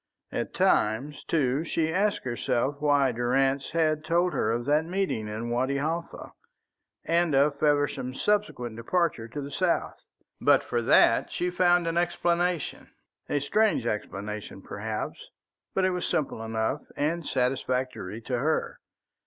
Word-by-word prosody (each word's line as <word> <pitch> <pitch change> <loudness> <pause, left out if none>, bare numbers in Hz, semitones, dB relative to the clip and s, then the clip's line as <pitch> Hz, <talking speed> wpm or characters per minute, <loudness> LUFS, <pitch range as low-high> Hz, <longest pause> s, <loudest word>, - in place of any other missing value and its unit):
At - - -3
times, 130 +8 +1
too, 145 -2 +1
she 160 -1 -1
asked 200 +3 +1
herself 125 +2 -1
why 145 -3 +3
Durrance 135 +3 +1
had 155 -2 +1
told 175 +2 +1
her - - +1
of 120 +1 -1
that 150 +3 +3
meeting 175 - -1
in 110 +3 -4
Wadi 130 +3 0
Halfa, 165 +4 -3 0.7
and 170 -3 +2
of 140 +1 +3
Feversham's 145 -3 +1
subsequent 200 - 0
departure 135 -1 0
to 145 +6 -6
the 140 +1 -7
south. 175 +4 0 0.4
But - - +5
for - - -1
that - - +4
she 180 0 -1
found 175 -1 +3
an 165 0 -1
explanation 175 -1 0 0.4
a 145 - +1
strange 210 - +2
explanation, 105 -1 -4
perhaps, - - -5 0.5
but 190 - +3
it 185 - +2
was 180 -1 -2
simple 135 -6 -1
enough 115 +5 -1 0.2
and 165 +4 0
satisfactory 125 -5 -1
to 125 +1 -2
her. 155 +5 -1
145 Hz, 140 wpm, -27 LUFS, 125-170 Hz, 0.7 s, But